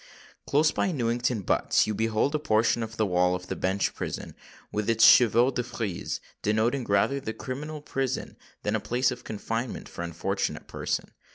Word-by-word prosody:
Close 155 +2 +4
by 190 - 0
Newington 120 - 0
Butts - - +2
you 110 - -1
behold 110 +6 +1
a 155 - +1
portion 115 -4 +2
of 115 0 -5
the 110 - +2
wall 90 -1 +2
of 90 0 -6
the - - -2
Bench 95 +1 0
Prison, - - -5 0.4
with 105 +1 -1
its 115 -1 +5
chevaux 120 +2 +6
de 125 - -1
frise, 110 -6 -4 0.2
denoting 115 +5 +1
rather 100 +7 +2
the 110 -4 -5
criminal 150 +5 -6
prison 135 -2 -2 0.3
than 105 +1 0
a - - +1
place 125 +4 +1
of 125 0 -7
confinement 115 +3 -4
for - - -8
unfortunate 90 +4 -2
persons. - - -3
115 Hz, 175 wpm, -27 LUFS, 105-130 Hz, 0.4 s, chevaux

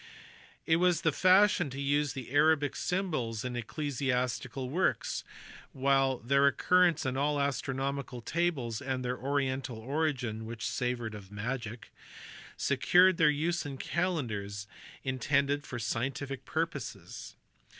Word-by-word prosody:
It 160 - +4
was 180 0 +3
the 160 - +3
fashion 185 0 +4
to 135 +1 -7
use 145 0 +1
the 130 -3 -7
Arabic 145 -1 +3
symbols 135 - -2
in 125 -1 -3
ecclesiastical 130 -1 -2
works; 175 +8 0 0.5
while 135 -1 +2
their 140 +4 +3
occurrence 175 +2 +3
in 130 0 -1
all 145 +1 +1
astronomical 140 -1 -2
tables 130 -4 -1
and 130 -1 -2
their 125 +1 -1
oriental 135 -2 -1
origin 125 -4 -2
(which 115 0 -5
savoured 125 -3 -2
of 100 -2 -10
magic) 115 +2 -5 0.6
secured 170 +8 +4
their 155 -2 +5
use 165 +4 0
in 140 -3 -6
calendars 110 - -2 0.4
intended 140 +2 0
for 120 - -5
scientific 130 +4 -3
purposes. 160 -5 -4
135 Hz, 120 wpm, -31 LUFS, 125-150 Hz, 0.6 s, their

